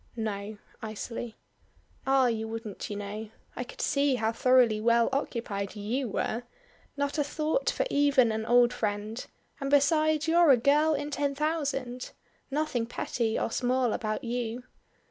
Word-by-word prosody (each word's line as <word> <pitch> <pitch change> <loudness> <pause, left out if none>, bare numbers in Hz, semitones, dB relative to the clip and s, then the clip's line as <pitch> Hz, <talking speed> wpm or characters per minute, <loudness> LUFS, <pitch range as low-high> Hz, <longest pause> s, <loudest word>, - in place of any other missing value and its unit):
"No," 215 -2 -4 0.2
icily. 220 +1 -6 0.7
"Ah, 270 -1 +4
you 225 -2 0
wouldn't, 225 -2 -6
you 205 - -4
know. 205 +2 -5 0.3
I 250 - -3
could 245 - -9
see 280 -1 +2
how 225 -2 0
thoroughly 240 -2 +4
well 235 +1 +4
occupied 215 -7 -3
you 230 +5 -2
were! 220 +3 -1 0.6
Not 285 +2 -1
a - - +3
thought 310 - 0
for - - 0
even 280 -5 +4
an 220 0 -2
old 245 0 +5
friend; 210 +2 -3 0.4
and 275 -1 -2
besides 310 +2 +3
you're 335 0 +5
a 265 - +8
girl 300 +5 +3
in 290 +1 -4
ten 285 0 -1
thousand. 280 -5 -2 0.4
Nothing 275 -5 -1
petty 230 -1 -1
or - - -1
small 250 -1 +1
about 215 -2 -2
you. 240 0 -3
245 Hz, 150 wpm, -29 LUFS, 220-285 Hz, 0.7 s, a